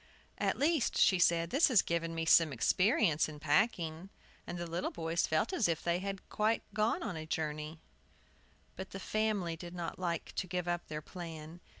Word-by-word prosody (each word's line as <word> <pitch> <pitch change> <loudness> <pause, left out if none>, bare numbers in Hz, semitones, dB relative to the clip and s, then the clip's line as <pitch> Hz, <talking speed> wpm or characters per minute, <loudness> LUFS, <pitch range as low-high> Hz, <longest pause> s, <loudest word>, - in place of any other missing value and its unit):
"At - - 0
least," 300 -3 +1
she 190 - +5
said, 170 -1 +3
"this 285 +5 +5
has 250 -9 +4
given 165 0 -2
me 165 0 -2
some 165 -1 +6
experience 165 - +2
in 150 -1 -9
packing." 165 +2 0 0.4
And 175 - -5
the 175 - -4
little 170 +2 -2
boys 165 0 -1
felt 160 - 0
as 265 - +2
if 165 -2 -1
they 170 0 +1
had 195 0 -5
quite 215 +2 0
been 215 +1 +1
a 155 0 -6
journey. 155 0 -3 1.0
But 190 +1 -7
the 195 - -7
family 205 -5 -1
did 175 +2 -9
not 175 0 -5
like 170 -3 -2
to 185 - -1
give 180 0 -3
up 175 0 -2
their 150 0 -5
plan. 165 -1 -8
170 Hz, 185 wpm, -33 LUFS, 160-195 Hz, 1.0 s, some